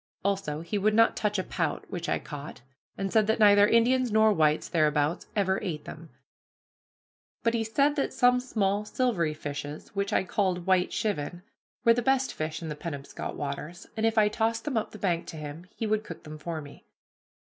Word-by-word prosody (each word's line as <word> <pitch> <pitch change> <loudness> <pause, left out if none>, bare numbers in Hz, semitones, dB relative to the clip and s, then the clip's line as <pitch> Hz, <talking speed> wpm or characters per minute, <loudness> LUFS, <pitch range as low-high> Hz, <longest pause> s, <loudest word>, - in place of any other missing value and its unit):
Also, 190 -7 -1
he 200 +5 -2
would 210 +2 +2
not 230 0 +5
touch 210 -1 0
a 185 - 0
pout, - - -2
which 175 -3 -4
I - - +2
caught, 145 -3 -8 0.4
and 195 -1 -3
said 215 -2 +4
that 220 - +2
neither 205 -1 +7
Indians 245 +2 +3
nor 220 0 +5
whites 155 -4 +2
thereabouts 150 -1 +1
ever 190 -2 +1
ate 155 -5 -4
them. 165 +1 -9 1.3
But 230 - +2
he 230 -1 +1
said 280 +6 +2
that 275 - 0
some 250 0 +4
small 210 -5 0
silvery 210 -9 0
fishes, 145 0 -6
which 200 +1 -2
I - - +2
called 185 -2 -1
white 185 -1 +3
chivin, 175 -3 -2 0.4
were 230 - +7
the 245 - 0
best 265 +1 +1
fish 155 +2 -4
in 160 - -4
the 150 - -4
Penobscot 145 -3 -6
waters, 150 +6 -5
and 220 - -2
if 225 0 +2
I 215 - +7
would 210 - -1
toss 225 0 +1
them 275 +2 -4
up 220 - 0
the - - -10
bank 175 -4 -1
to 160 - -7
him, 155 +3 -8
he 225 - -3
would 215 0 +1
cook 165 - -9
them 155 0 -9
for 160 0 -4
me. 145 -1 -13
195 Hz, 205 wpm, -28 LUFS, 155-220 Hz, 1.3 s, neither